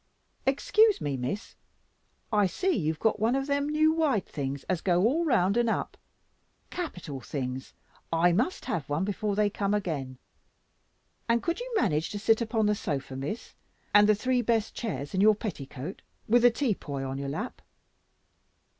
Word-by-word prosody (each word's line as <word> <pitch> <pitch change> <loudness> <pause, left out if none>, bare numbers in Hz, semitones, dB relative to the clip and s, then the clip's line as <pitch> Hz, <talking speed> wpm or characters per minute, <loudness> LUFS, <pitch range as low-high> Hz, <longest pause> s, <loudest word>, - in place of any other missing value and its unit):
Excuse 425 +10 +4
me, 145 -2 -2
Miss, 130 - -4 0.8
I 205 -2 +4
see 370 - 0
you 160 - +1
have 160 - -8
got 220 -1 +1
one 225 +4 +2
of 270 0 0
them 285 0 0
new 310 +1 +3
wide 295 - +1
things 140 -1 -4
as 180 -3 -2
go 180 -1 +2
all 300 +9 +2
round 210 - +3
and 240 -1 +3
up - - -2 0.8
capital 180 - -5
things, 130 -1 -5 0.4
I 165 +2 +4
must 240 - 0
have 175 - -3
one 150 +6 0
before 205 0 -1
they 210 0 +3
come 205 0 0
again. 145 -10 -3 1.1
And 230 0 +2
could 335 +4 -1
you - - -6
manage 155 - +1
to 210 - -4
sit 220 +2 +3
upon 225 -1 +1
the 210 - +3
sofa, 140 -8 -3
Miss, 140 - -5 0.4
and 205 0 +7
the 215 - +6
three 250 +4 +1
best 225 -2 0
chairs 145 - -4
in 190 - +1
your 215 +1 +6
petticoat, 150 - -6 0.3
with 240 +2 +5
the 245 - +7
tea 235 -1 0
poy 140 -7 -5
on 135 +1 -4
your 140 0 -3
lap?" 205 - -5
205 Hz, 175 wpm, -28 LUFS, 150-240 Hz, 1.1 s, and